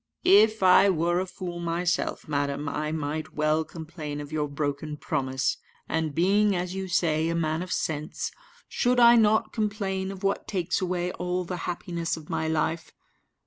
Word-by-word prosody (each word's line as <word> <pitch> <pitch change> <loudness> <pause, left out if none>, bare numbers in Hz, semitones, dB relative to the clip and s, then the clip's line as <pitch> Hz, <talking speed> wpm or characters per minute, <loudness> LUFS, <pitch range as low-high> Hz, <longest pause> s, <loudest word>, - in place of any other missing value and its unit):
"If 215 +1 +5
I 185 +2 +7
were 175 0 +1
a 190 - -2
fool 175 -1 -6
myself, 170 +1 -1
madam, 145 0 -1
I 150 +2 -2
might 155 0 -4
well 155 +1 +2
complain 155 -2 -7
of 145 0 -8
your 150 -1 -1
broken 145 +1 -3
promise; 130 -5 -1 0.3
and 160 -2 -1
being, 200 +4 +3
as 180 0 -2
you 190 0 -4
say, 165 -3 +1
a 170 - -1
man 160 0 0
of 180 - -6
sense, 150 -1 -2 0.4
should 245 0 +1
I 235 0 +8
not 220 -1 +3
complain 200 -3 -2
of 195 0 -10
what 195 0 0
takes 180 -3 -1
away 180 -1 -1
all 180 0 -2
the 180 +1 -4
happiness 170 -1 -3
of 155 -1 -10
my 160 - -1
life? 160 +1 -1
170 Hz, 170 wpm, -27 LUFS, 155-185 Hz, 0.4 s, I